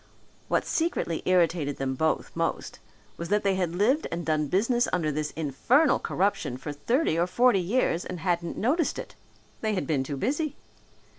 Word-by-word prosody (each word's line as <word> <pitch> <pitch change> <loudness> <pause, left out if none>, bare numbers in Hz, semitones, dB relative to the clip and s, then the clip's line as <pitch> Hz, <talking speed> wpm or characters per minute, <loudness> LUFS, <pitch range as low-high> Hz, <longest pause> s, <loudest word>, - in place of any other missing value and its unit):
What - - +1
secretly 320 - -1
irritated 170 -5 +2
them 135 -1 -1
both 160 +4 0
most - - -2 0.4
was 170 - -5
that 210 +1 +2
they 195 -1 +2
had 180 -3 -1
lived 250 - +2
and 170 0 -3
done 155 -2 +1
business 235 - +2
under 160 -4 0
this 150 +1 -2
infernal 165 - +2
corruption 190 -9 -1
for 145 +3 -6
thirty 230 - +1
or 175 - +2
forty 240 +2 +4
years 180 -2 +1
and 180 -3 -6
hadn't 170 -1 -1
noticed 290 - +1
it. - - -7 0.5
They 215 -1 0
had 185 - -1
been 145 -5 0
too 140 +1 -5
busy. 295 - -1
180 Hz, 170 wpm, -27 LUFS, 155-230 Hz, 0.5 s, forty